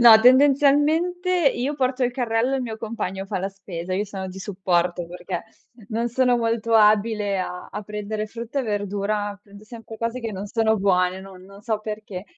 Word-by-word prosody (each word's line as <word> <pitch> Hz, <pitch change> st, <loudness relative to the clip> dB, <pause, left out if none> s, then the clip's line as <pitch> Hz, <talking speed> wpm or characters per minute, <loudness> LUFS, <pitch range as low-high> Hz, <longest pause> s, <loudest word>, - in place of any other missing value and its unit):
No, 230 Hz, -2 st, +10 dB
tendenzialmente 290 Hz, +7 st, +4 dB, 0.2 s
io 260 Hz, +5 st, -1 dB
porto 260 Hz, -2 st, 0 dB
il 245 Hz, -, 0 dB
carrello, 240 Hz, +1 st, 0 dB
il 265 Hz, -, -2 dB
mio 225 Hz, -3 st, -5 dB
compagno 215 Hz, -4 st, -4 dB
fa 195 Hz, -, -2 dB
la 190 Hz, +2 st, -2 dB
spesa, 185 Hz, -2 st, -6 dB
io 200 Hz, +3 st, 0 dB
sono 195 Hz, -2 st, -6 dB
di 185 Hz, +1 st, -8 dB
supporto 180 Hz, -3 st, 0 dB
perché 175 Hz, 0 st, -5 dB, 0.5 s
non 230 Hz, +2 st, -1 dB
sono 250 Hz, +1 st, +2 dB
molto 230 Hz, -1 st, 0 dB
abile 210 Hz, -2 st, +3 dB
a 180 Hz, -1 st, -5 dB
a 210 Hz, -, -5 dB
prendere 210 Hz, +1 st, -4 dB
frutta 235 Hz, +5 st, -4 dB
e -, -, -3 dB
verdura, 205 Hz, -1 st, -2 dB
prendo 205 Hz, 0 st, -15 dB
sempre 225 Hz, -1 st, -10 dB
cose 230 Hz, +2 st, -2 dB
che 225 Hz, -2 st, -4 dB
non 195 Hz, +1 st, -5 dB
sono 220 Hz, +1 st, +2 dB
buone, 185 Hz, -2 st, +2 dB
no 190 Hz, -1 st, -11 dB
non 195 Hz, +2 st, -14 dB
so 220 Hz, -2 st, -1 dB
perché, 210 Hz, -3 st, -6 dB
215 Hz, 185 wpm, -23 LUFS, 195-235 Hz, 0.5 s, No